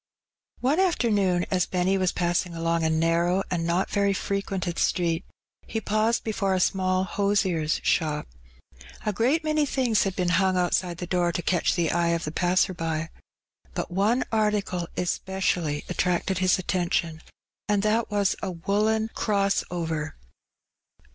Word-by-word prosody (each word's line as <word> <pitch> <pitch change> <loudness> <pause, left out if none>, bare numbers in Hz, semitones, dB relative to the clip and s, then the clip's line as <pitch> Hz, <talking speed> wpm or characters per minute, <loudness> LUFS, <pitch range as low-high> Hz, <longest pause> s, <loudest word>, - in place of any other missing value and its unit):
One 280 +7 +2
afternoon^ 205 - +2
as 185 -2 +1
Benny 185 +1 +1
was 185 -2 +1
passing 175 0 -1
along 165 0 0
a 160 - +2
narrow 170 +4 +2
and 170 -2 -1
not 175 +3 0
very 200 -1 +2
frequented 195 -3 -2
street^ 170 -2 +1 0.5
he 220 - -2
paused 215 +2 +1
before 200 -3 0
a - - +1
small 185 0 +1
hosier^s 190 -6 0
shop. 150 -3 0 0.8
A 210 - 0
great 260 - +1
many 305 -1 +1
things 255 -6 +1
had 195 -2 -1
been 180 -1 0
hung 190 -1 +2
out 180 -1 +1
side 175 -2 0
the 180 - -5
door 175 -1 +1
to 175 - -3
catch 180 -3 +1
the 170 -3 +1
eye 170 0 +2
of 165 - -8
the 150 - -3
passer 180 +2 +2
by. 165 -1 -3 0.6
But - - -3
one 210 +7 +2
article 210 -5 0
especially 180 -4 -1
attracted 180 +1 0
his 185 -1 +3
attention, 175 -3 -1 0.5
and 205 -1 +2
that 220 +2 +1
was 205 -2 +1
a - - -2
woollen 210 +5 0
"cross 200 -2 +1
over." 160 -3 -3
185 Hz, 155 wpm, -26 LUFS, 170-205 Hz, 0.8 s, his